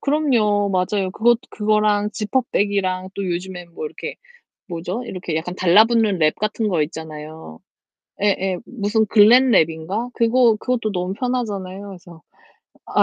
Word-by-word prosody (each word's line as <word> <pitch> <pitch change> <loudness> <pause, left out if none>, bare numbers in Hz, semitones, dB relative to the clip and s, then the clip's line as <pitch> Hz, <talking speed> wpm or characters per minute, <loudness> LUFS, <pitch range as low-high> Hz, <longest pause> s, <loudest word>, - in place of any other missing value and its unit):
그럼요. 230 -9 +1
맞아요. 185 +1 0
그것 240 +1 +3
그거랑 210 -1 +1
지퍼백이랑 200 -4 -1
또 200 - -4
요즘에 180 0 -4
뭐 170 -2 -7
이렇게 - - -7 0.5
뭐죠? 180 +7 -4
이렇게 180 -6 -5
약간 175 +3 -3
달라붙는 210 +2 +4
랩 155 -1 +3
같은 215 +1 -2
거 170 -5 +1
있잖아요. 155 - -9 0.6
예예. 190 -2 +1
무슨 220 -2 0
글랜 235 +5 +6
랩인가? 165 +8 +1
그거 235 -1 +3
그것도 240 -4 -1
너무 180 0 -2
편하잖아요. 205 -5 -3
그래서 175 -3 -12 0.7
아 - - +2
200 Hz, 315 characters per minute, -21 LUFS, 180-220 Hz, 0.7 s, 글랜